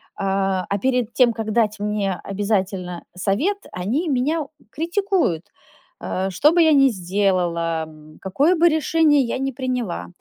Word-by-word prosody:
а, 195 -1 -1
а 200 - 0
перед 250 -1 0
тем, 245 -3 +4
как 220 -1 -4
дать 215 -2 +1
мне 205 -2 -1
обязательно 190 -3 -2
совет, 215 - 0
они 230 - -2
меня, 295 +3 0 0.3
критикуют, 345 - 0 0.6
э, 190 +1 -2
что 275 +11 +3
бы 345 +1 +3
я 320 -1 +5
ни 275 -1 +5
сделала, 175 -5 0
м, 155 0 -16
какое 275 - +2
бы 340 0 +4
решение 310 -1 +3
я 245 -1 -2
ни 270 0 -1
приняла. 250 -7 -3
215 Hz, 145 wpm, -21 LUFS, 190-285 Hz, 0.6 s, я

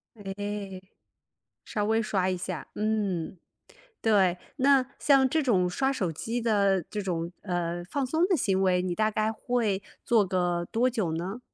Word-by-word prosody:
诶， 200 -1 -5 0.8
稍 210 -1 -2
微 225 +1 +2
刷 195 -4 0
一 185 - -1
下。 175 -3 -5
嗯， 205 -5 -1 0.6
对， 190 -5 +3 0.2
那 270 -1 +4
像 275 -2 +4
这 315 +4 +1
种 190 -9 +2
刷 265 +9 0
手 185 -10 -1
机 230 +9 -3
的 200 -5 +2
这 210 - -3
种， 170 -2 -3
呃， 175 -2 -2
放 280 -2 -1
松 320 +7 +1
的 370 - +3
行 195 -6 +1
为， 180 -1 +3
你 180 -1 -2
大 215 +2 +1
概 215 +1 0
会 220 -5 -1 0.2
做 225 -4 +4
个 175 -2 0
多 240 +3 +2
久 215 -10 -1
呢？ 190 +8 -4
205 Hz, 170 characters per minute, -28 LUFS, 185-230 Hz, 0.8 s, 那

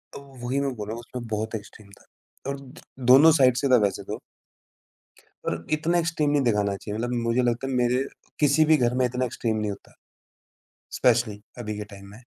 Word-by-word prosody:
ओ - - -6 0.2
वही 130 +3 0
मैं 140 -1 -1
बोल 105 -2 -6
रहा 110 - -4
हूँ - - -7
उसमें 120 0 -8
बहुत 110 +1 -3
एक्सट्रीम 105 -1 -10
था - - -23 0.4
और 140 0 -3
द 135 -1 -14 0.3
दोनों 150 +5 +9
साइड 130 -1 +6
से 140 - +1
था 125 - +7
वैसे 100 - -2
तो। - - -6 1.3
पर - - -3
इतना 160 +3 +1
एक्सट्रीम 160 -3 0
नहीं 145 - +3
दिखाना 105 -4 +1
चाहिए, 105 +2 -6
मतलब 120 +1 -2
मुझे 115 +2 +2
लगता 120 +2 0
है 135 - -3
मेरे 125 +1 +2 0.4
किसी 150 +1 +4
भी 155 0 +5
घर 125 -2 +1
में 130 - +3
इतना 125 +1 -1
एक्सट्रीम 115 -2 -2
नहीं 105 -1 -1
होता। 100 - -12 1.1
स्पेशली 120 -4 +2 0.2
अभी 110 -3 -4
के 105 - -4
टाइम 100 0 -12
में। 110 +5 -14
120 Hz, 205 wpm, -25 LUFS, 110-135 Hz, 1.3 s, दोनों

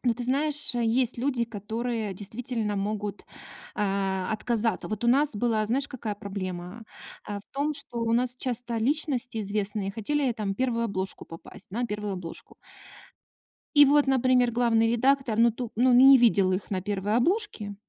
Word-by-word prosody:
Ну 240 - +2
ты 245 - -6
знаешь, 290 +2 0
есть 240 +1 +2
люди, 250 -1 0
которые 225 0 -4
действительно 215 +2 -3
могут, 205 0 -4 0.5
а-а, 195 -2 -1
отказаться. 225 +1 -1
Вот 215 +2 -4
у - - +2
нас 275 0 +4
была, 220 -1 0
знаешь, 270 +6 -1
какая 225 -5 -5
проблема? 195 -1 -6 0.5
Э, 205 -1 -4
в - - -13
том, 285 +2 0
что 280 -4 -5
у 230 0 0
нас 245 +1 +3
часто 245 -2 -3
личности 255 -1 -1
известные 205 -1 -2
хотели 255 +5 -1
там 210 -4 -3
1 235 0 -1
обложку 195 -3 -4
попасть. 165 +4 -11
На 240 +5 -2
1 210 -2 -4
обложку. 180 -3 -9 1.2
И 290 0 +8
вот, 290 +1 +4
например, 255 -2 +3
главный 230 -1 +2
редактор, 255 -1 +1
ну 235 +1 +5
ту 235 0 -6
ну, 250 +2 +4
не 265 +2 +8
видел 200 -6 +3
их 185 +2 -3
на 190 -2 -2
1 205 +2 -1
обложке 265 - -1
230 Hz, 160 wpm, -26 LUFS, 205-255 Hz, 1.2 s, И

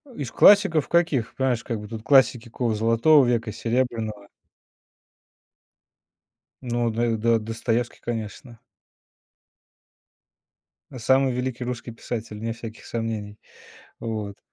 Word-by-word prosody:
Из 135 -5 -5
классиков 170 -7 +5
каких? 165 -9 +1
Понимаешь, 130 -3 0
как 115 -3 -4
бы 105 - -9
тут 110 0 -7
классики 130 -3 +4
какого 115 -1 -1
золотого 115 +7 +4
века, 120 -2 0
серебряного. 115 -4 -2 2.4
Ну, 120 -1 -1
До 115 0 0
До 115 +1 +2
Достоевский, 115 +2 -2
конечно. 115 0 -6 2.4
Самый 130 +3 +3
великий 125 0 -3
русский 120 -1 -5
писатель, 115 -2 -6
вне 115 +1 -3
всяких 115 -1 -10
сомнений. 110 -3 -4 0.6
Вот. 105 -3 -5
115 Hz, 105 wpm, -24 LUFS, 110-125 Hz, 2.4 s, классиков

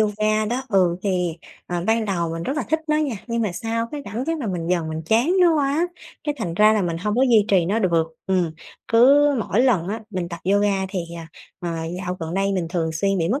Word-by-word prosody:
yoga 215 0 +1
đó 245 +4 -2
ừ, 185 -5 +3
thì, 180 -4 -1 0.3
ờ, 175 -1 -3
ban 225 0 +2
đầu 175 -5 -1
mình 165 0 -4
rất 270 - -3
là 300 - 0
thích 315 - +2
nó 305 - +3
nha, 300 -5 0
nhưng 235 -1 -1
mà 210 -5 -1
sau 230 +4 -2
cái 295 -1 -5
cảm 220 +5 -4
giác 325 +2 -1
là 265 - -4
mình 175 -4 -3
dần 170 -3 0
mình 160 0 -4
chán 235 - +3
nó 345 -2 +5
quá, 295 +4 +1 0.4
cái 295 -1 -1
thành 175 -7 -3
ra 210 +4 +5
là 215 -2 +1
mình 170 -2 -1
hông 210 +4 -1
có 255 - +3
duy 230 -6 +5
trì 190 -5 +4
nó 200 +6 0
được 170 -6 +2 0.2
ừm. 185 -3 +1 0.4
Cứ 275 +6 +6
mỗi 220 0 0
lần 220 -10 +2
á 220 +3 -3
mình 180 -3 -3
tập 170 -1 -7
yoga 200 -1 +2
thì, 190 - -3 0.2
à, 165 -1 -8 0.3
ờ, 175 - -3 0.3
dạo 180 -1 -4
gần 165 +1 -4
đây 195 +1 +1
mình 185 -3 -1
thường 165 -2 -1
xuyên 195 +5 0
bị 165 -1 0
mất 265 +6 0
205 Hz, 250 wpm, -22 LUFS, 175-235 Hz, 0.4 s, Cứ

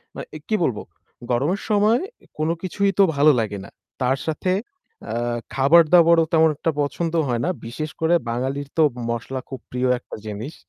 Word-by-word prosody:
মানে - - -6
এ - - -4
কি 215 - +1
বলব? 125 -9 0 0.5
গরমের 145 +11 0
সময় 215 +3 +3 0.4
কোন 155 +1 0
কিছুই 195 +2 0
তো 195 - +8
ভালো 145 +2 +6
লাগে 105 -2 -2
না। - - -12 0.3
তার 130 +1 +2
সাথে 160 +4 -1 0.6
আ - - -3 0.4
খাবার 140 +6 +6
দাবারও 170 -1 +6
তেমন 160 0 +5
একটা 165 - 0
পছন্দ 160 +3 -2
হয় 120 -2 -1
না। - - 0 0.2
বিশেষ 155 +7 -5
করে 165 +2 +3
বাঙালির 135 +4 -2
তো 160 - +5 0.3
মসলা 120 +3 -3
খুব 130 - -6
প্রিয় 125 +1 0
একটা - - -10
জিনিস। 110 +8 -6
150 Hz, 175 wpm, -22 LUFS, 125-170 Hz, 0.6 s, তো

